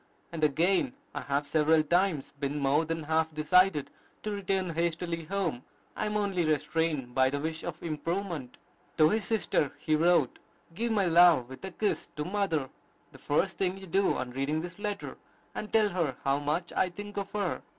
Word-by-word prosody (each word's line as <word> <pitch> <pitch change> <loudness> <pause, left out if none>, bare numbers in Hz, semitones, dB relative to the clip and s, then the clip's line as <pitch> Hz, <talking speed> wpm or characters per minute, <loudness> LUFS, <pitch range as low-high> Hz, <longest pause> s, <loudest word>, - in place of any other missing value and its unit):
And 165 -2 -4
again, 180 - +2 0.2
"I - - -4
have 140 +1 -1
several 155 +1 +3
times 170 -2 +1
been 140 +1 -2
more 145 +3 +2
than 165 0 -3
half 160 +1 +1
decided 155 0 +3 0.3
to 215 - -2
return 195 -3 -1
hastily 170 0 -2
home: 170 -8 -2 0.3
I 215 - -1
am 210 0 -1
only 195 -4 0
restrained 155 -3 0
by 130 0 +4
the 145 +1 -2
wish 160 +2 -3
of - - -6
improvement." 165 -3 -3 0.4
To 155 -1 +6
his 215 0 0
sister 190 -9 0
he 155 - +1
wrote, 170 +3 +3 0.3
"Give 230 +6 -1
my 205 -3 +2
love 170 -7 +6
with 130 - -10
a - - -4
kiss 205 +3 -2
to 150 - -3
mother, 180 -8 -1 0.4
the - - -15
first 170 +6 0
thing 190 0 0
you 195 - -9
do 195 +3 +2
on 125 -1 -4
reading 140 +5 -1
this 175 +2 -8
letter, 205 -1 -4 0.3
and 215 - -6
tell 215 -2 +4
her 170 -8 -1
how 135 +1 +2
much 155 +4 -2
I 185 - +2
think 205 +3 -9
of 200 -1 -4
her." 200 -4 -1
165 Hz, 185 wpm, -29 LUFS, 150-195 Hz, 0.4 s, To